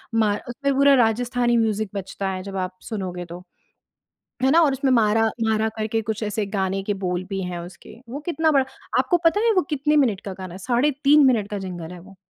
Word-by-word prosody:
म्हार 210 -2 +2
उसमें 280 +3 -1
पूरा 280 +1 +5
राजस्थानी 240 +1 +2
म्यूजिक 215 -2 0
बजता 195 0 -4
है 185 -1 -4
जब 195 -1 -6
आप 185 0 -11
सुनोगे 185 -5 -4
तो, 175 +1 -10 1.0
है 265 - +4
ना? 335 - +6
और 295 -4 +4
उसमें 270 0 0
म्हारा 225 -2 +3 0.2
म्हारा 220 0 +1
करके 220 +1 -1
कुछ 215 +1 -5
ऐसे 210 0 -2
गाने 190 0 -1
के 205 +1 -1
बोल 180 0 -1
भी 195 -1 -3
हैं 180 -1 -4
उसके, 175 +4 -11
वो 275 - -5
कितना 320 -1 +2
बड़ा 275 -3 +3 0.3
आपको 350 - +2
पता 330 +5 +4
है 460 - +4
वो 370 - +4
कितने 300 +1 +1
मिनट 205 -6 -1
का 195 - -4
गाना 185 -2 -8
है - - -8
साढ़े 245 +8 +1
3 290 +1 +6
मिनट 215 -5 +1
का 205 - -3
जिंगल 175 -2 -7
है 175 - -10
वो, 195 +2 -15
220 Hz, 220 wpm, -23 LUFS, 190-265 Hz, 1.0 s, ना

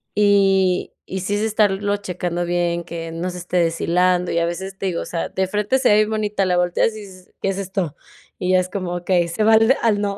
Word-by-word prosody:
y 195 -3 +3
y 190 - -4
sí 200 +3 -1
es 205 - -1
estarlo 205 -2 +1
checando 180 -3 -3
bien, 175 0 -1
que 165 -1 -6
no 170 +3 -3
se 180 0 -7
esté 180 +1 -3
deshilando 175 +1 +1
y 170 - +1
a 170 - +1
veces 190 +3 -5
te 195 - -5
digo, 175 -2 -2
o - - -5
sea, 170 - -3
de 190 0 -1
frente 210 +6 0
se 260 - +3
ve 210 - +6
bien 215 0 +3
bonita, 210 -2 0
la 180 -1 +1
volteas 180 +5 +1
y 215 - -8
dices: 185 -2 -14
"¿Qué 195 - 0
es 195 - -2
esto?". 190 -5 -3 0.4
Y 185 -1 0
ya 185 - +5
es 185 0 -2
como: 185 -2 -4
"Okey", 175 0 +1
ese 170 +6 -2
va 220 +1 +5
al 225 +4 +5
al 215 -3 +2
no. 200 -1 -2
185 Hz, 250 wpm, -21 LUFS, 175-205 Hz, 0.4 s, ve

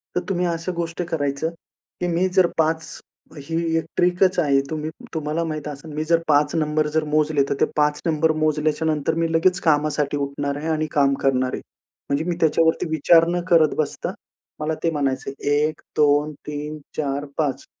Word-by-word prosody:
तर 180 - +1
तुम्ही 180 -1 0
अशा 170 +1 -2
गोष्ट 170 +1 -3
करायचं, 145 -1 -1
की 175 +1 -9
मी 175 +2 +1
जर 185 -2 +5
5 160 0 +1 0.5
ही 145 +4 -5 0.2
एक 165 - -1
ट्रिकच 180 +1 +3
आहे, 140 -4 +3
तुम्ही 155 0 -3 0.2
तुम्हाला 155 +1 -1
माहीत 155 -2 -4
असेल 150 +2 -8
मी 155 - -2
जर 165 +1 +3
5 150 +1 +3
नंबर 155 -1 +1
जर 160 - +3
मोजले 150 -2 +3
तर - - +2
ते - - +6
5 150 0 +2
नंबर 160 0 +2
मोजल्याच्यानंतर 155 -1 +1
मी 165 0 0
लगेच 180 +3 +3
कामासाठी 150 -2 +1
उठणार 140 0 -3
आहे 155 +2 -5
आणि 155 -1 0
काम 140 -1 +3
करणार 130 -1 +1
आहे. - - -3 0.5
म्हणजे 140 +3 +1
मी 175 -1 -1
त्याच्यावरती 160 +1 +3
विचार 165 +2 +5
न 175 +1 0
करत 160 -3 +5
बसता, 155 - -2 0.5
मला 155 +1 -1
ते 165 - +3
म्हणायचंय, 135 -2 -2 0.2
1, 150 +2 +1 0.2
2, 150 0 +3
3, 150 +1 -5 0.2
4, 145 -1 -1
5, 145 -4 -1
155 Hz, 175 wpm, -22 LUFS, 145-165 Hz, 0.5 s, ते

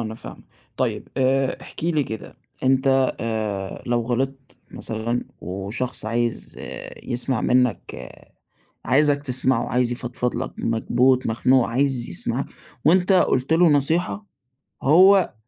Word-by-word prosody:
أنا 110 0 -5
فاهمك. - - -11 0.3
طيِّب، - - -2
آآ، 135 0 +1
احكِ - - -9
لي 155 -4 +2
كده 110 -2 -8 0.3
أنت 135 0 +2
آآ، 105 -4 -3
لو 120 0 +1
غلطت 130 +3 -3
مثلًا، 115 +2 -3 0.2
وشخص 100 +8 -4
عايز 120 +1 -2 0.5
يسمَّع 120 0 -1
منك 125 -7 0 0.8
عايزك 145 +1 +3
تسمعه، 130 -2 0
عايز 125 -1 +1
يفضفِض 120 0 -3
لك، - - -4
مكبوت، 125 +3 +2
مخنوق، 125 +2 +2
عايز 130 0 0
يسمَّع، - - -3 0.4
وأنت 180 +4 +4
قُلت 135 -5 +2
له 170 +1 +5
نصيحة، 165 +8 +1 0.6
وهو 185 - +5
130 Hz, 115 wpm, -23 LUFS, 115-140 Hz, 0.8 s, له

